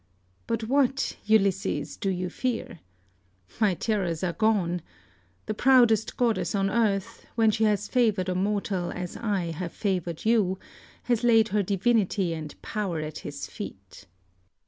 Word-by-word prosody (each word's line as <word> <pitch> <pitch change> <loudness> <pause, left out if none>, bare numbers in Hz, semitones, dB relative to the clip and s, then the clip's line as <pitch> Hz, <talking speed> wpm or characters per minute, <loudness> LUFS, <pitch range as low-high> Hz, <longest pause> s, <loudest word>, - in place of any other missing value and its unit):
But 230 -1 -1
what, 270 +2 +1
Ulysses, 200 -2 +1
do 195 - -2
you 180 -1 -1
fear? 240 -8 -3 0.8
My 210 -5 +3
terrors 185 -5 -1
are 175 -2 0
gone. 190 -6 +1 0.6
The 215 - -2
proudest 235 -3 +4
goddess 235 -3 +1
on 195 0 +1
earth, 215 -1 0
when 225 -2 +4
she 220 +1 +1
has 210 -1 +1
favoured 220 -7 +2
a 185 - 0
mortal 195 -2 -1
as 180 -1 -5
I 195 -7 -1
have 170 +1 -5
favoured 180 -5 -2
you, 210 -5 +3 0.5
has 240 -2 0
laid 225 -2 +5
her 210 0 +2
divinity 200 -2 +1
and 155 -2 -7
power 195 -7 -2
at 155 0 -5
his - - -6
feet. - - -9
205 Hz, 145 wpm, -27 LUFS, 180-225 Hz, 0.8 s, laid